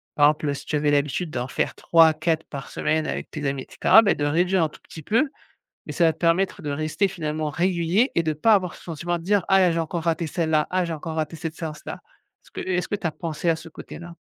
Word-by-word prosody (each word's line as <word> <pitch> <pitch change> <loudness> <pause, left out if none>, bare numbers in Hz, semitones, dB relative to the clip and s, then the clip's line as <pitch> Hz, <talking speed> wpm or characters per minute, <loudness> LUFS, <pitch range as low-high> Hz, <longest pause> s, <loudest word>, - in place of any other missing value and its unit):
par 145 - +5
exemple 150 -1 -1
si - - -9
tu - - -2
avais 150 0 +2
l'habitude 145 +4 0
d'en 125 -3 -3
faire - - -1
3-4 160 0 +3
par 140 -2 -7
semaine 155 0 -1
avec - - -4
tes 150 -2 -3
amis 135 -1 -2
et - - -19
cetera. 225 - +6
Bah 205 -3 +3
de 145 - -1
réduire 175 +4 +2
un 160 - 0
tout - - -17
petit 160 - -11
peu. 235 - +2 0.6
Mais - - -5
ça 175 - +2
va 160 - +3
te - - -29
permettre 180 +3 +1
de 150 - -3
rester 155 +7 0
finalement 155 -4 -3
régulier 180 - +1
et 170 - +2
de 160 -1 0
pas 215 +9 +4
avoir 185 -3 0
ce - - -14
sentiment 170 +1 -3
de - - -11
dire: 200 +1 +1
«Ah 195 - +5
là 185 - +5
là - - +1
j'ai 165 - -1
encore 165 +1 -3
raté 165 0 0
celle-là, 160 -2 0
ah 185 0 +1
j'ai 165 - -3
encore 160 +1 -6
raté 160 +1 -2
cette 160 +1 -5
séance 155 -2 -6
là». - - -6 0.4
Est-ce - - -21
que - - -7
est-ce 180 -1 0
que - - -2
tu 195 - -4
as 165 - +1
pensé 165 0 -4
à 165 - +1
ce 160 - -11
côté-là? 170 +2 -10
165 Hz, 270 wpm, -24 LUFS, 155-175 Hz, 0.6 s, cetera